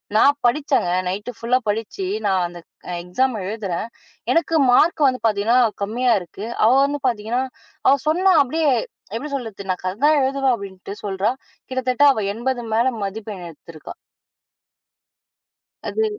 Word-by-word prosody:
நான் 280 Hz, +6 st, +5 dB
படிச்சேன், 275 Hz, -, +2 dB, 0.2 s
நைட்டு 205 Hz, +6 st, -4 dB
ஃபுல்லா 235 Hz, +3 st, +1 dB
படிச்சு, 205 Hz, -2 st, -3 dB, 0.2 s
நான் 190 Hz, -2 st, +2 dB
அந்த 175 Hz, 0 st, -10 dB, 0.4 s
எக்ஸாம் 245 Hz, +8 st, 0 dB
எழுதுறேன். 200 Hz, -2 st, -3 dB, 0.4 s
எனக்கு 330 Hz, 0 st, +1 dB, 0.2 s
மார்க்கு 310 Hz, +6 st, +4 dB
வந்து 255 Hz, -2 st, 0 dB
பாத்தீங்கன்னா, 215 Hz, +3 st, +2 dB, 0.3 s
கம்மியா 240 Hz, +5 st, +1 dB
இருக்கு. 180 Hz, +4 st, -8 dB, 0.2 s
அவ 225 Hz, -, +6 dB
வந்து 290 Hz, +1 st, -2 dB
பாத்தீங்கன்னா 230 Hz, +2 st, -2 dB, 0.4 s
அவ 275 Hz, -, +7 dB
சொன்னா 370 Hz, +4 st, +4 dB
அப்படியே 310 Hz, +3 st, 0 dB, 0.5 s
எப்படி 285 Hz, +6 st, -4 dB
சொல்றது? 225 Hz, -7 st, -5 dB
நான் 180 Hz, -, -4 dB
கதைதான் 255 Hz, +12 st, +2 dB
எழுதுவேன் 270 Hz, 0 st, +1 dB
அப்படின்னுட்டு 195 Hz, -2 st, -8 dB
சொல்றா. 195 Hz, +1 st, 0 dB, 0.4 s
கிட்டத்தட்ட 255 Hz, +1 st, 0 dB
அவ 220 Hz, -, -2 dB
80 240 Hz, +3 st, -2 dB
மேல 230 Hz, +2 st, +3 dB, 0.2 s
மதிப்பெண் 200 Hz, -1 st, -5 dB
எடுத்துருக்கா. 160 Hz, 0 st, -11 dB, 1.9 s
அது 440 Hz, -, 0 dB
230 Hz, 130 wpm, -21 LUFS, 200-265 Hz, 1.9 s, அவ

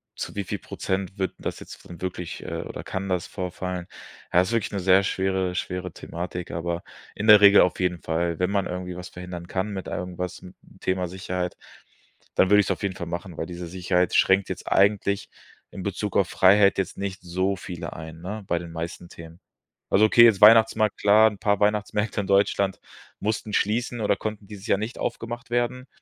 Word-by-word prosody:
zu -, -, -6 dB
wie 100 Hz, -, -2 dB
viel -, -, -4 dB
Prozent 95 Hz, +1 st, -4 dB
wird 95 Hz, -1 st, -1 dB
das -, -, -4 dB
jetzt -, -, -12 dB
dann 85 Hz, -, -10 dB
wirklich 90 Hz, -2 st, -5 dB
äh, -, -, -4 dB
oder -, -, -7 dB
kann 95 Hz, +1 st, -4 dB
das 90 Hz, -2 st, 0 dB
vorfallen. 90 Hz, -1 st, -5 dB, 0.4 s
Ja, 90 Hz, -, +5 dB
ist 95 Hz, -, -2 dB
wirklich 115 Hz, -3 st, 0 dB
'ne 100 Hz, -, -2 dB
sehr 95 Hz, +1 st, +4 dB
schwere 95 Hz, -1 st, -1 dB
schwere 90 Hz, 0 st, -3 dB
Thematik, 90 Hz, +2 st, -6 dB
aber 85 Hz, +1 st, -3 dB, 0.3 s
in 105 Hz, -, -4 dB
der 105 Hz, -1 st, +9 dB
Regel 100 Hz, 0 st, +8 dB
auf 90 Hz, -, +1 dB
jeden 90 Hz, -1 st, 0 dB
Fall, 85 Hz, 0 st, -1 dB
wenn 90 Hz, +1 st, 0 dB
man 100 Hz, -1 st, 0 dB
irgendwie 90 Hz, 0 st, -5 dB
was 90 Hz, 0 st, -8 dB
verhindern 90 Hz, -1 st, -8 dB
kann 95 Hz, +3 st, -2 dB
mit 95 Hz, -1 st, -5 dB
irgendwas, 90 Hz, 0 st, -5 dB
m 90 Hz, -, -11 dB, 0.3 s
Thema 95 Hz, -1 st, -1 dB
Sicherheit, 90 Hz, 0 st, -4 dB, 0.8 s
dann 95 Hz, -, +4 dB
würde 105 Hz, -, +7 dB
ich's 95 Hz, -, -3 dB
auf -, -, -3 dB
jeden 100 Hz, -2 st, -1 dB
Fall 85 Hz, -3 st, -6 dB
machen, 85 Hz, +1 st, -6 dB
weil 80 Hz, -, -3 dB
diese 90 Hz, 0 st, -7 dB
Sicherheit 90 Hz, +1 st, 0 dB
schränkt 95 Hz, 0 st, +4 dB
jetzt -, -, -6 dB
eigentlich 100 Hz, 0 st, +2 dB, 0.4 s
in 95 Hz, -, -7 dB
Bezug 100 Hz, +1 st, -3 dB
auf 95 Hz, -3 st, +2 dB
Freiheit 100 Hz, +1 st, +5 dB
jetzt 95 Hz, -3 st, -2 dB
nicht 100 Hz, 0 st, -4 dB
so 95 Hz, +3 st, -1 dB
viele 90 Hz, -2 st, -7 dB
ein, 80 Hz, 0 st, -9 dB
ne, 105 Hz, +4 st, -6 dB
bei 85 Hz, -, 0 dB
den 85 Hz, -1 st, -9 dB
meisten 85 Hz, +1 st, -6 dB
Themen. 85 Hz, +1 st, -12 dB, 0.5 s
Also 105 Hz, +2 st, +5 dB
okay, 115 Hz, +2 st, +7 dB
jetzt 110 Hz, -5 st, +4 dB
Weihnachtsmarkt 110 Hz, -1 st, +6 dB
klar, 110 Hz, +2 st, +6 dB
'n 100 Hz, -, -11 dB
paar 100 Hz, -2 st, +1 dB
Weihnachtsmärkte 105 Hz, 0 st, 0 dB
in 100 Hz, -, -6 dB
Deutschland 100 Hz, 0 st, +2 dB, 0.4 s
mussten 105 Hz, 0 st, -2 dB
schließen 120 Hz, +3 st, 0 dB
oder 105 Hz, -, +2 dB
konnten 105 Hz, -1 st, -5 dB
dieses 105 Hz, -1 st, -10 dB
Jahr -, -, +3 dB
nicht 110 Hz, +4 st, -5 dB
aufgemacht 120 Hz, +1 st, -4 dB
werden 125 Hz, +2 st, -1 dB
95 Hz, 200 wpm, -25 LUFS, 90-105 Hz, 0.8 s, der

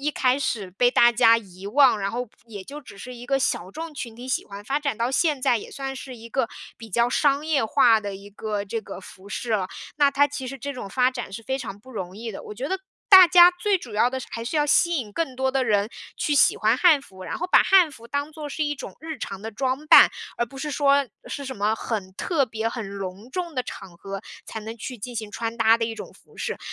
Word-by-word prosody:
一 295 Hz, +2 st, 0 dB
开 255 Hz, -3 st, +2 dB
始 230 Hz, -8 st, -2 dB
被 245 Hz, +6 st, +3 dB
大 240 Hz, -1 st, +5 dB
家 230 Hz, -1 st, +5 dB
遗 190 Hz, -3 st, -13 dB
忘， 260 Hz, +1 st, +5 dB
然 195 Hz, 0 st, -1 dB
后 245 Hz, +2 st, -4 dB, 0.2 s
也 205 Hz, -4 st, -9 dB
就 290 Hz, +6 st, -9 dB
只 220 Hz, -8 st, -14 dB
是 250 Hz, +5 st, -8 dB
一 240 Hz, 0 st, -10 dB
个 270 Hz, +2 st, +1 dB
小 185 Hz, -8 st, -1 dB
众 320 Hz, +7 st, -7 dB
群 235 Hz, -5 st, -7 dB
体 245 Hz, +2 st, -9 dB
喜 260 Hz, -, -1 dB
欢， 200 Hz, 0 st, -10 dB
发 275 Hz, +6 st, -1 dB
展 280 Hz, -7 st, -2 dB
到 235 Hz, +1 st, +1 dB
现 300 Hz, -2 st, +2 dB
在， 240 Hz, -2 st, +2 dB
也 -, -, -10 dB
算 270 Hz, -1 st, -5 dB
是 260 Hz, -1 st, -8 dB
一 230 Hz, 0 st, -11 dB
个 245 Hz, -1 st, 0 dB, 0.3 s
比 225 Hz, -1 st, -12 dB
较 235 Hz, +5 st, +2 dB
商 285 Hz, +3 st, +1 dB
业 295 Hz, -7 st, +2 dB
化 220 Hz, 0 st, +4 dB
的 200 Hz, -2 st, -5 dB
一 200 Hz, +1 st, -12 dB
个 205 Hz, 0 st, -4 dB
这 225 Hz, +3 st, -3 dB
个 -, -, -9 dB
服 190 Hz, +1 st, -14 dB
饰 230 Hz, +3 st, -5 dB
了。 190 Hz, -4 st, 0 dB, 0.3 s
那 290 Hz, -1 st, +4 dB
它 280 Hz, +1 st, +4 dB
其 285 Hz, -2 st, -6 dB
实 270 Hz, +1 st, -7 dB
这 280 Hz, +3 st, -5 dB
种 200 Hz, -6 st, -7 dB
发 250 Hz, +3 st, +3 dB
展 245 Hz, -6 st, -6 dB
是 195 Hz, -, -6 dB
非 265 Hz, +4 st, -2 dB
常 215 Hz, -7 st, -7 dB
不 260 Hz, +5 st, -15 dB
容 190 Hz, -4 st, -6 dB
易 225 Hz, +1 st, -6 dB
的， -, -, -8 dB
我 -, -, -8 dB
觉 250 Hz, +7 st, -5 dB
得， 380 Hz, +2 st, -2 dB, 0.3 s
大 375 Hz, -3 st, +10 dB
家 355 Hz, +1 st, +8 dB
最 380 Hz, +2 st, 0 dB
主 240 Hz, -10 st, -10 dB
要 235 Hz, +4 st, +3 dB
的 260 Hz, -, -3 dB
是 260 Hz, -, -8 dB
还 230 Hz, -, -5 dB
是 245 Hz, -, -3 dB
要 295 Hz, -1 st, +2 dB
吸 340 Hz, +3 st, +3 dB
引 220 Hz, -8 st, -4 dB
更 270 Hz, -3 st, -3 dB
多 265 Hz, 0 st, +1 dB
的 265 Hz, -1 st, +1 dB
人， 205 Hz, -2 st, +2 dB, 0.3 s
去 295 Hz, -, 0 dB
喜 280 Hz, -, +5 dB
欢 220 Hz, +3 st, +2 dB
汉 320 Hz, -2 st, +5 dB
服， 190 Hz, -9 st, -14 dB
然 -, -, -5 dB
后 355 Hz, -, -2 dB
把 -, -, +7 dB
汉 370 Hz, -4 st, +5 dB
服 235 Hz, -5 st, -13 dB
当 285 Hz, +3 st, -2 dB
作 305 Hz, -1 st, -7 dB
是 310 Hz, +2 st, -2 dB
一 295 Hz, 0 st, -1 dB
种 -, -, -9 dB
日 320 Hz, 0 st, -6 dB
常 195 Hz, -4 st, -6 dB
的 220 Hz, +2 st, -6 dB
装 265 Hz, +5 st, -2 dB
扮， -, -, +9 dB, 0.3 s
而 235 Hz, -, +1 dB
不 270 Hz, +4 st, -12 dB
是 300 Hz, +3 st, -3 dB
说， 280 Hz, -1 st, +3 dB, 0.2 s
是 280 Hz, -, -5 dB
什 265 Hz, -1 st, -6 dB
么 210 Hz, +2 st, +1 dB
很 200 Hz, -5 st, -4 dB
特 305 Hz, -, 0 dB
别、 225 Hz, -2 st, -3 dB
很 230 Hz, -4 st, -6 dB
隆 195 Hz, +5 st, -7 dB
重 345 Hz, +1 st, -4 dB
的 255 Hz, -, 0 dB
场 190 Hz, -6 st, -10 dB
合， 195 Hz, +2 st, -7 dB, 0.2 s
才 -, -, -6 dB
能 220 Hz, +2 st, -7 dB
去 245 Hz, +3 st, -7 dB
进 245 Hz, +4 st, -7 dB
行 215 Hz, -1 st, -4 dB
穿 230 Hz, +2 st, -4 dB
搭 225 Hz, 0 st, +4 dB
的 230 Hz, -, 0 dB
一 225 Hz, -, -4 dB
种 -, -, -9 dB
服 -, -, -22 dB
饰。 460 Hz, -1 st, -4 dB
245 Hz, 285 characters per minute, -24 LUFS, 215-280 Hz, 0.3 s, 大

